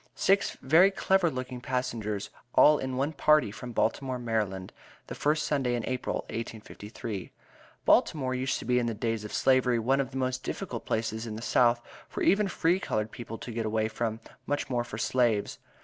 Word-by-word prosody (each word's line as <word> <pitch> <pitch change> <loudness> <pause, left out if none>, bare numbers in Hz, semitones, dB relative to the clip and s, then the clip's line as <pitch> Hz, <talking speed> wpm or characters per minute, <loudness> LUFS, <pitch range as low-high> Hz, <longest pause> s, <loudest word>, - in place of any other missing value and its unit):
Six 195 +1 +2
very 165 +8 +6
clever 190 -2 +2
looking 130 -2 -5
passengers, 115 -5 -3 0.2
all 150 0 +7
in 130 -1 -3
one 140 +4 0
party 150 -5 +4
from 120 +3 -8
Baltimore, 130 +3 0
Md., 105 -6 -2 0.3
the - - -7
first 150 +1 +1
Sunday 130 -5 0
in 120 - -3
April, 130 -1 -2
1853. 110 -2 -6 0.5
Baltimore 130 -5 +3
used 130 +1 -1
to - - -8
be 125 0 +3
in 120 - 0
the 115 - -2
days 115 0 -2
of 105 - -7
Slavery 130 -2 +3
one 130 +5 +2
of 130 - -4
the 135 - -6
most 130 -1 -1
difficult - - -5
places 110 0 -2
in 110 - -5
the 110 - -7
South 120 -1 +3 0.3
for - - -4
even 205 +1 +4
free 175 0 +1
colored 110 - -2
people 115 -1 -7
to 120 - -7
get 115 -1 -2
away 110 0 +1
from, 110 0 -3 0.3
much 145 -1 -2
more 120 -1 +1
for 105 - -7
slaves. 115 -3 +1
125 Hz, 185 wpm, -29 LUFS, 110-135 Hz, 0.5 s, all